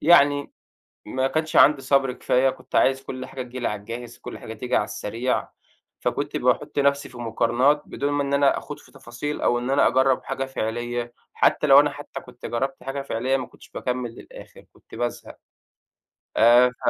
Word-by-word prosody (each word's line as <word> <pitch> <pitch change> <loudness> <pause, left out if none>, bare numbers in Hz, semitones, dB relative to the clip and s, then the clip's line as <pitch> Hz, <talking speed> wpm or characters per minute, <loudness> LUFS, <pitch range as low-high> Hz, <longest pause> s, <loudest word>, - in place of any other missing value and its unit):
يعني 145 -3 +5 0.5
ما 130 +5 -1
كانش 155 +3 -1
عندي 145 -1 +6
صبر 135 -1 +2
كفاية، 130 +1 +2
كنت - - -14
عايز 135 0 +3
كُلّ 130 0 -6
حاجة 130 - -6
تيجي 125 +1 -8
لي 120 - 0
على 105 -1 -4
الجاهز، 120 +3 -8
كُلّ 125 - -8
حاجة 110 - -8
تيجي 120 +3 -1
على 105 - +2
السريع، 115 +4 -2 0.5
فكنت - - -2
باحُطّ - - 0
نفسي 140 0 +2
في 125 - -12
مقارنات 120 +5 +2
بدون 145 0 -2
ما 145 - +1
إن 140 0 -1
أنا 140 -1 +3
آخوض - - -8
في - - -19
تفاصيل، 135 +6 -6
أو 120 - +2
إن 125 +2 -3
أنا 140 - +4
أجرَّب 130 0 +2
حاجة 135 - -3
فعلية، 120 0 -3 0.2
حتى - - +3
لو 140 0 +9
أنا 145 0 +2
حتى 140 -1 -8
كنت 125 -1 -11
جرّبت 135 +3 -3
حاجة 135 +1 -4
فعلية 130 +1 0
ما 130 -2 -4
كنتش - - -18
باكمِّل 125 -1 -3
للآخر، - - -13
كنت - - -17
بازهق. 120 0 -4 1.0
آآ، 120 +2 +7
ف - - -1
130 Hz, 190 wpm, -24 LUFS, 120-140 Hz, 1.0 s, لو